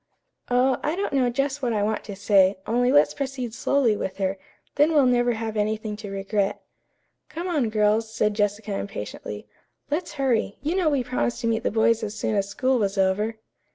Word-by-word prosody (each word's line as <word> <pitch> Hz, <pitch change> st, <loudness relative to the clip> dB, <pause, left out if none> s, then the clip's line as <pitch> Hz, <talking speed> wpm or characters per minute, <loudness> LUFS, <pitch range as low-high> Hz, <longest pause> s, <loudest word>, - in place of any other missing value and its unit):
"Oh, 250 Hz, +1 st, +3 dB
I 305 Hz, +3 st, -1 dB
don't 395 Hz, -3 st, -2 dB
know 260 Hz, -3 st, +3 dB
just 275 Hz, +3 st, -1 dB
what 245 Hz, -3 st, 0 dB
I 210 Hz, -2 st, +1 dB
want 215 Hz, +1 st, -1 dB
to 200 Hz, -, -7 dB
say, 195 Hz, -1 st, +4 dB
only 245 Hz, +2 st, +2 dB
let's 290 Hz, +1 st, +5 dB
proceed 265 Hz, -4 st, -4 dB
slowly 240 Hz, -2 st, +2 dB
with 190 Hz, -2 st, -4 dB
her, 190 Hz, 0 st, -1 dB, 0.3 s
then 300 Hz, +3 st, +3 dB
we'll 285 Hz, -3 st, +6 dB
never 245 Hz, -1 st, +3 dB
have 220 Hz, -1 st, -4 dB
anything 215 Hz, 0 st, -1 dB
to 210 Hz, -1 st, -8 dB
regret." 195 Hz, 0 st, -1 dB, 0.7 s
"Come 340 Hz, +3 st, -5 dB
on, 295 Hz, -10 st, +1 dB
girls," 215 Hz, +1 st, +1 dB
said 210 Hz, -1 st, +1 dB
Jessica 205 Hz, 0 st, -1 dB
impatiently. 105 Hz, -, -6 dB, 0.5 s
"Let's 330 Hz, +4 st, -2 dB
hurry. 255 Hz, -7 st, 0 dB
You 310 Hz, +4 st, 0 dB
know 365 Hz, -5 st, +2 dB
we 280 Hz, -4 st, +1 dB
promised 245 Hz, -1 st, -2 dB
to 230 Hz, -, -1 dB
meet 225 Hz, 0 st, +1 dB
the -, -, 0 dB
boys 225 Hz, +1 st, +2 dB
as 215 Hz, 0 st, -4 dB
soon 215 Hz, -, -1 dB
as 200 Hz, -1 st, 0 dB
school 255 Hz, +5 st, +1 dB
was 200 Hz, -1 st, -1 dB
over." 195 Hz, +4 st, +1 dB
225 Hz, 195 wpm, -24 LUFS, 205-260 Hz, 0.7 s, we'll